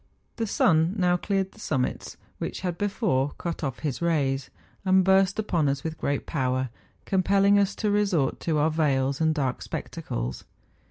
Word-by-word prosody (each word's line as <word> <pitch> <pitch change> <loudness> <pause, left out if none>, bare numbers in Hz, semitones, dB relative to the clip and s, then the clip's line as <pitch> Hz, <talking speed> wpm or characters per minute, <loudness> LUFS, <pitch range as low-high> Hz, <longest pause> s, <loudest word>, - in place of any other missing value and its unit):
The 225 -1 -1
sun 165 -1 +3
now 180 -2 +3
cleared 195 +1 -1
the - - -19
summits 130 -10 -2 0.2
which - - -4
had 180 -2 -2
before 180 - 0
cut 170 -2 -4
off 135 -3 -3
his 145 0 -2
rays, 140 -6 0 0.3
and 190 0 +4
burst 190 +1 +4
upon 170 -9 +1
us 140 0 -2
with 160 -1 -5
great 140 -1 -1
power, 130 -3 -1 0.4
compelling 200 +1 +3
us 200 0 +1
to 210 -2 0
resort 195 -9 +1
to 160 -2 0
our 155 +2 +2
veils 140 -3 +1
and 160 0 +3
dark 135 -4 -1
spectacles. - - -5
165 Hz, 165 wpm, -26 LUFS, 140-195 Hz, 0.4 s, and